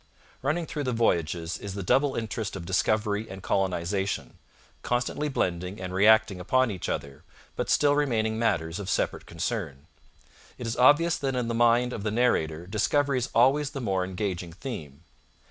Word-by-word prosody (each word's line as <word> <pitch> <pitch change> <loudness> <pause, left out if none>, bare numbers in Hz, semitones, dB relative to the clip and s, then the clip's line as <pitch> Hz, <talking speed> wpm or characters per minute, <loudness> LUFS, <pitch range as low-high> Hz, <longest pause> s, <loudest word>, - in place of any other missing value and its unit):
Running 155 +5 0
through 150 -2 -4
the 125 - 0
Voyages 85 -7 0
is 100 -2 -6
the 100 - -4
double 135 +9 +2
interest 110 -2 -3
of 90 -3 -6
discovery 105 +3 0
and 95 0 -9
colonization, 95 +1 -1 0.4
constantly 125 +5 -1
blending 90 -5 -2
and 90 0 -5
reacting 105 0 +4
upon 130 +5 +2
each 95 -4 -5
other, 70 -1 -4 0.3
but - - -3
still 145 -1 +4
remaining 110 -6 0
matters 85 -6 0
of 100 -2 -5
separate - - -1
concern. 85 - -4 0.7
It 125 - -6
is 115 - -2
obvious 150 +6 +5
that 135 -2 -2
in 125 -2 -1
the - - -1
mind 120 +1 +3
of 110 - -5
the 105 - -1
narrator 85 -9 +1
discovery 130 +7 +1
is 120 - -3
always 135 +4 +4
the 145 -2 -6
more 95 -6 0
engaging 90 -2 -4
theme. 80 - -8
110 Hz, 165 wpm, -27 LUFS, 90-125 Hz, 0.7 s, obvious